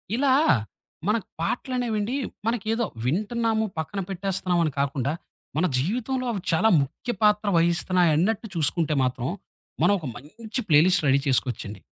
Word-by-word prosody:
ఇలా 265 +1 +3 0.7
మనకు 210 -3 0
పాటలనేవెండి, 240 +2 -1 0.3
మనకేదో 225 0 0 0.2
వింటున్నాము, 220 - 0
పక్కన 160 +5 -3
పెట్టేస్తున్నాము 185 -2 -1
అని 155 - 0
కాకుండా, 140 0 0 0.5
మన 180 - +3
జీవితంలో 245 - -1
అవి 200 - -3
చాలా 195 +7 +3
ముఖ్య 155 - -4
పాత్ర 210 0 +3
వహిస్తున్నాయన్నట్టు 175 +4 +2
చూసుకుంటే 155 0 +1
మాత్రం 125 -1 -1 0.5
మనం 205 - +5
ఒక 155 - -9
మంచి 220 - -6
ప్లేలిస్ట్ 175 +5 +5
రెడీ 135 +1 +4
చేసుకోవచ్చండి. 120 -6 -1
185 Hz, 120 wpm, -25 LUFS, 150-225 Hz, 0.7 s, మనం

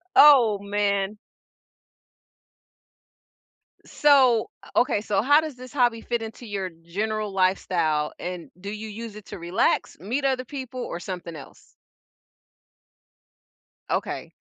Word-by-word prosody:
Oh, 240 -9 +7
man. 200 0 -1 2.7
So 265 -6 +4
uh, - - -14
okay, 240 -4 +3
so 205 -2 0
how 290 +5 +5
does 310 -4 -6
this 255 0 -11
hobby 240 -4 +2
fit 235 0 -2
into 225 +2 -8
your 200 -4 -3
general 205 +6 -3
lifestyle? 170 -5 +1
And, 180 -1 -6
do 200 - -6
you 215 +1 -6
use 220 0 -7
it 210 - -11
to - - -8
relax? 175 +2 0
Meet 245 - -2
other 260 -1 +1
people? 260 -1 -6
Or, 170 - -4
something 175 -2 -6
else? 145 - -14 2.1
Okay. - - -2
210 Hz, 120 wpm, -25 LUFS, 185-245 Hz, 2.7 s, Oh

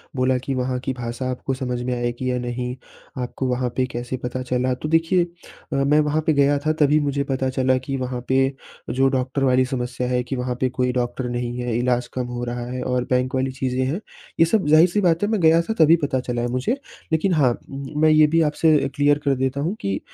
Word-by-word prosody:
बोला 130 0 +2
कि 135 - -2
वहाँ 125 0 -1
की 130 0 -3
भाषा 125 +1 -4
आपको 130 +1 -3
समझ 125 -2 -3
में 125 0 -1
आएगी 120 +1 -2
या 125 - -1
नहीं 125 0 -3 0.5
आपको 125 +1 -3
वहाँ 125 0 0
पे 130 - +2
कैसे 120 +2 -4
पता 125 +1 -3
चला। 125 +1 0
तो 140 +5 -5
देखिए 165 +2 +3
अ, 170 -3 -11
मैं 140 +2 +3
वहाँ 150 +1 +1
पे 160 - +4
गया 145 0 +3
था 155 - +3
तभी 150 +1 +4
मुझे 140 -1 0
पता 130 0 0
चला 130 0 +1
कि 135 +1 -4
वहाँ 125 -1 -3
पे 130 - +2 0.5
जो 135 +2 +2
डॉक्टर 130 +2 -1
वाली 130 0 +3
समस्या 125 -1 -3
है 125 0 +1
कि 130 +2 -4
वहाँ 125 0 -2
पे 130 - +2
कोई 125 0 0
डॉक्टर 125 0 -2
नहीं 120 0 -3
है, 120 -2 -2
इलाज़ 125 0 0
कम 125 -1 -2
हो 120 0 -5
रहा 120 0 -4
है 130 0 -4
और 125 -1 0
बैंक 125 +1 +1
वाली 130 0 0
चीज़े 130 -1 -2
हैं। 145 +9 -1 0.4
ये 165 - +7
सब 190 -1 +1
ज़ाहिर-सी 170 +6 +5
बात 170 0 +2
है 205 - +1
मैं 220 - +1
गया 165 +1 +5
था 220 +6 -3
तभी 160 +1 +7
पता 130 -2 0
चला 120 -1 -3
है 120 - 0
मुझे। 130 - 0 0.3
लेकिन 160 +4 +2
हाँ 140 -6 +4 0.2
म 140 +2 -5
मैं 155 - +6
ये 155 0 +6
भी 165 +2 +2
आपसे 155 0 +3 0.2
क्लियर 145 0 +3
कर 140 -1 +3
देता 130 +1 -1
हूँ 175 +7 -1
कि 100 0 -1
130 Hz, 235 wpm, -22 LUFS, 125-150 Hz, 0.5 s, ये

